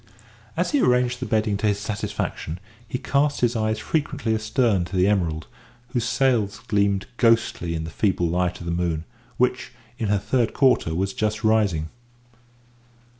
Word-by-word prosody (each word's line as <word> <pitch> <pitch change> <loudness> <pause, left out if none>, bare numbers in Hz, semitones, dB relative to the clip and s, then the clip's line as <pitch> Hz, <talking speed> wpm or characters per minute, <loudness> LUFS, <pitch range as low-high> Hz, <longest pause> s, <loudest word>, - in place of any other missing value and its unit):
As - - +1
he 290 - +3
arranged 125 0 +2
the 130 - -4
bedding 110 -2 +1
to 105 +2 0
his 100 -1 +2
satisfaction, 105 -5 -4 0.3
he 125 - -3
cast 140 +3 +1
his 120 0 +2
eyes 110 0 0
frequently 145 -5 -1
astern 110 -2 +1
to 95 - -7
the 90 0 +4
Emerald, 85 -6 0 0.4
whose 120 -2 -1
sails 120 -6 +1
gleamed 100 -2 +1
ghostly 115 -8 +2
in 80 - -3
the 80 - -6
feeble 95 +1 +1
light 90 +2 0
of 85 - -8
the 85 - -2
moon, 85 -2 -1 0.3
which, 125 0 0 0.3
in 110 - -1
her 105 0 +2
third 120 +3 0
quarter, 125 - +3
was 95 +2 -1
just 110 0 -1
rising. 100 -8 +2
105 Hz, 165 wpm, -24 LUFS, 90-120 Hz, 0.4 s, the